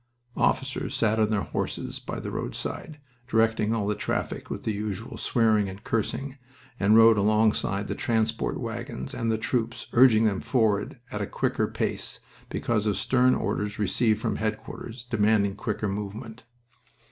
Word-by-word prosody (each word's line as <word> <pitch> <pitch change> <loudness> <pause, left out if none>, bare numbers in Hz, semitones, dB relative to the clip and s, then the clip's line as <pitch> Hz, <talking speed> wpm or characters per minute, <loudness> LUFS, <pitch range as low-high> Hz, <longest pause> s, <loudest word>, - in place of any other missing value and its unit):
Officers 135 0 0
sat 110 -1 +2
on 110 -1 +3
their 105 -2 +1
horses - - -3
by - - -5
the - - -5
roadside, 150 -2 -5 0.3
directing 110 -2 +2
all 115 -3 0
the 105 - +1
traffic 105 - -3
with - - -5
the 110 - -1
usual 105 +2 -4
swearing 110 -4 +2
and 95 +2 -10
cursing, 130 +5 -2 0.4
and 105 +3 +5
rode 115 -1 +7
alongside 105 -1 +2
the - - -2
transport 110 - 0
wagons 65 - -5
and 115 -2 -1
the 110 - +1
troops, 115 0 -1
urging 120 -3 +6
them 100 -3 +1
forward 110 -5 +1
at 105 - -3
a 100 - -2
quicker - - 0
pace - - -3 0.3
because 110 -2 0
of 105 - +1
stern 130 0 +3
orders 105 0 -2
received 110 +1 +2
from - - -1
headquarters 110 +2 -5
demanding 105 -4 +2
quicker 105 -1 -2
movement. 105 +4 -5
110 Hz, 155 wpm, -27 LUFS, 105-115 Hz, 0.4 s, rode